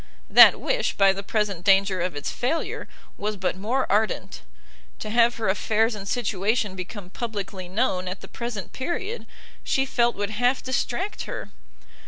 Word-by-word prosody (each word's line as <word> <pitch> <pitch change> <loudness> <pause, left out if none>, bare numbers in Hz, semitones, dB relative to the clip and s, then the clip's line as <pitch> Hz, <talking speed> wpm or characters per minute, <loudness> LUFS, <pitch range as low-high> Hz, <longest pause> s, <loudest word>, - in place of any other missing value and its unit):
That - - +9
wish, - - 0
by 195 -1 +5
the 195 - -5
present 200 -3 -1
danger 195 -1 +4
of 180 -2 -2
its 145 - -3
failure, 270 +7 -2 0.3
was 210 0 -2
but 185 -1 -1
more 230 +8 0
ardent; 215 +2 0 0.6
to 215 - -6
have 235 +1 +4
her 225 -2 -2
affairs 220 +4 +2
and 200 -2 -7
situation 210 -2 0
become 185 0 -7
publicly 200 -6 -5
known 185 -3 0
at 185 +1 -5
the 195 - -10
present 235 -4 -6
period, 385 - -4 0.4
she 270 -2 +1
felt 240 -2 +1
would 205 +1 -3
half 245 +4 +1
distract 260 +9 -2
her. - - -6
210 Hz, 160 wpm, -25 LUFS, 195-240 Hz, 0.6 s, That